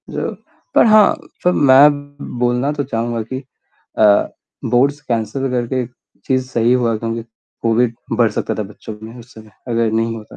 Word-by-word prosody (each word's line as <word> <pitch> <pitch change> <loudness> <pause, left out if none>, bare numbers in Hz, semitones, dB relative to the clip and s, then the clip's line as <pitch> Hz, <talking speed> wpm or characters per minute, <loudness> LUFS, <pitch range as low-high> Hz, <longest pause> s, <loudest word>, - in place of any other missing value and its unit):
जो - - -3 0.4
पर - - +6
हाँ, 215 -2 +6 0.3
सर 180 - +4
मैं 145 -1 +4 0.2
बोलना 125 +3 +1
तो 145 -1 -2
चहूँगा 115 -2 -2
कि 130 +4 -5 0.6
अ, 105 -2 +5 0.4
बोर्ड्स 140 +4 +2
कैंसल 135 +1 -2
करके 125 0 -1 0.4
चीज़ 130 -1 0
सही 120 -1 +2
हुआ 120 -3 +1
क्योंकि 115 +1 -4 0.4
कोविड 115 +1 +2 0.2
बढ़ 115 -2 +3
सकता - - -2
था 110 - -3
बच्चों 105 +1 -10
में, 115 +3 -10
उस 120 +1 -15
समय 110 -1 -14 0.2
अगर 115 -1 +1
नहीं 115 +1 0
होता, 110 -1 -12
120 Hz, 160 wpm, -18 LUFS, 115-135 Hz, 0.6 s, पर